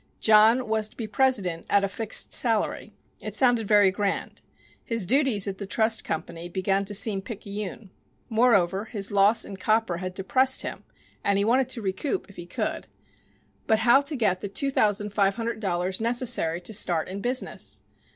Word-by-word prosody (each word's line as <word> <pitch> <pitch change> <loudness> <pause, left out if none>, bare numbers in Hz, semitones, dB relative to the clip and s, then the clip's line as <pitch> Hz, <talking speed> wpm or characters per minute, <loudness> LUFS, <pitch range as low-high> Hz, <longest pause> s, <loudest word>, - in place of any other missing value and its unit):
John 220 +3 +5
was 220 -1 -1
to - - -23
be 230 - -4
president 210 -7 0
at 200 -1 +3
"a - - +1
fixed 220 +2 0
salary." 225 -3 0 0.3
It - - -7
sounded 245 -5 +2
very 205 -2 +5
grand. 200 0 -3 0.4
His 230 -4 -2
duties 245 -3 +2
at 190 -1 -5
the 200 - -6
trust 220 +2 +1
company 170 +2 -5
began 195 +2 -1
to 205 +1 -3
seem 200 -1 +1
picayune. 205 -1 -7 0.4
Moreover, 210 -4 +2
his 205 -3 -3
loss 205 +2 +4
in 195 - -9
copper 215 -3 0
had 185 +1 -6
depressed 260 +7 +2
him - - -6 0.4
and 200 -1 +1
he 200 - +1
wanted 255 +3 +2
to 235 -4 -3
recoup, 240 - -3
if - - -19
he 175 - -9
could. - - -4 0.8
But 220 - +3
how 245 +3 +6
to 290 +2 -2
get 205 -7 0
the 205 - -3
two 275 +8 -2
thousand 210 -3 +1
five 200 -2 +2
hundred 230 -1 -4
dollars 185 -1 -2
necessary 230 -8 +1
to 200 +5 -5
start 175 -5 +1
in 195 +2 -6
business? 250 +3 -3
210 Hz, 180 wpm, -25 LUFS, 195-230 Hz, 0.8 s, how